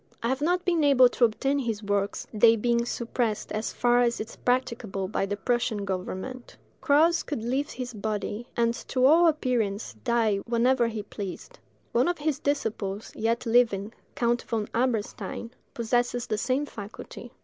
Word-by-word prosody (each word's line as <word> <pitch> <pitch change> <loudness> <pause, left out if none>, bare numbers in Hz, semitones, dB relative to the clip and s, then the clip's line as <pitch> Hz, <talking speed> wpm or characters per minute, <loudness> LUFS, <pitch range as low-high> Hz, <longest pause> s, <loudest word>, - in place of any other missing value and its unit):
I 230 - +1
have 265 +2 -1
not 355 +4 +1
been 340 -4 +2
able 265 -3 +6
to 245 - +3
obtain 270 +5 0
his 225 -5 -3
works, 200 0 -1
they 225 +1 +6
being 235 +1 +1
suppressed 235 -3 -2
as 215 +1 -2
far 245 0 +3
as 240 -1 +1
is 215 - -6
practicable 230 -6 -1
by 195 0 -1
the 205 +1 -3
Prussian 220 -2 0
government. 190 +6 -5 0.2
Krause 320 +4 +4
could 260 -7 -4
leave 265 +5 -1
his 250 -1 -6
body, 215 +2 -3
and, 235 0 +3
to 255 +2 0
all 330 +5 +6
appearance, 245 -9 0
die 230 -4 +2
whenever 235 +3 +2
he 220 -2 -4
pleased. 205 - -8 0.3
One 245 +5 +3
of 350 0 0
his 300 -1 -1
disciples, 220 -7 -2
yet 230 +3 0
living, 225 -3 +2 0.2
Count 240 0 +1
von 220 -3 -3
Eberstein, 230 -2 -2 0.2
possesses 240 +1 0
the 215 - -2
same 260 +5 0
faculty. 220 +1 -9
235 Hz, 160 wpm, -27 LUFS, 215-255 Hz, 0.3 s, able